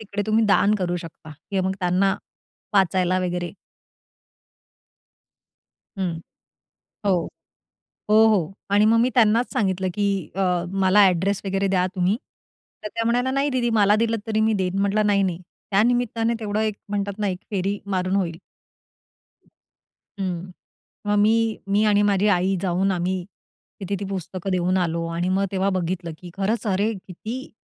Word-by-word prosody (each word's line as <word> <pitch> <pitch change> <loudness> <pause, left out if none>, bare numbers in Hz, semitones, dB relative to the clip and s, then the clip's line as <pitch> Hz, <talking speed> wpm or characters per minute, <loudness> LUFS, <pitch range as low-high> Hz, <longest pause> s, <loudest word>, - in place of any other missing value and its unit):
तिकडे 205 -1 -4
तुम्ही 220 +1 +3
दान 205 +1 +4
करू 175 -2 -1
शकता 165 -2 -10 0.2
किंवा 190 -2 0
मग 190 - -1
त्यांना 185 +2 +2 0.6
वाचायला 185 -1 +3
वगैरे 175 -1 -2 2.5
हं. 185 -3 -1 0.9
हो. 185 -4 +2 0.8
हो, 210 - +5
हो 195 -5 +1 0.2
आणि 205 +1 +5
मग 225 +1 +4
मी 240 +2 +3
त्यांनाच 230 0 +3
सांगितलं, 190 -6 0
की 200 -3 -1
अ, 195 - -1 0.4
मला 200 +2 +6
एड्रेस 185 +3 0
वगैरे 195 0 0
द्या 185 -1 +2
तुम्ही. 185 +3 +1 0.7
तर - - -3
त्या 230 - 0
म्हणाल्या, 245 +3 +1
"नाही 275 +2 +1
दीदी 250 -3 0
मला 205 -1 +4
दिलत 225 +1 0
तरी 220 -1 0
मी 220 0 +3
देईन." 190 -2 -1
म्हटलं, 200 +2 +2
"नाही, 200 -1 +3
नाही." 180 -3 -1 0.3
त्या 200 +1 +4
निमित्ताने 235 -1 +1
तेवढं 210 -1 -2
एक 215 -1 0
म्हणतात 200 0 -3
ना 210 - 0
एक 185 -2 -2
फेरी 200 0 -1
मारून 185 0 0
होईल. 170 -4 -1 1.6
हं, 185 -3 -6 0.6
मग 205 0 +2
मी, 225 +1 +2
मी 205 +2 +3
आणि 205 -1 +4
माझी 205 -1 +2
आई 190 0 +2
जाऊन 190 +1 +1
आम्ही 180 0 -2 0.6
तिथे 200 +1 -2
ती - - -3
पुस्तकं 190 0 -4
देऊन 185 0 +1
आलो 170 -2 -1
आणि 175 +2 -1
मग 190 +1 +1
तेव्हा 195 +1 +1
बघितलं, 170 -1 -3
की 180 - -10
खरंच 215 +4 -1
अरे 205 +2 +1
किती! 215 +7 -8
195 Hz, 155 wpm, -23 LUFS, 185-215 Hz, 2.5 s, मला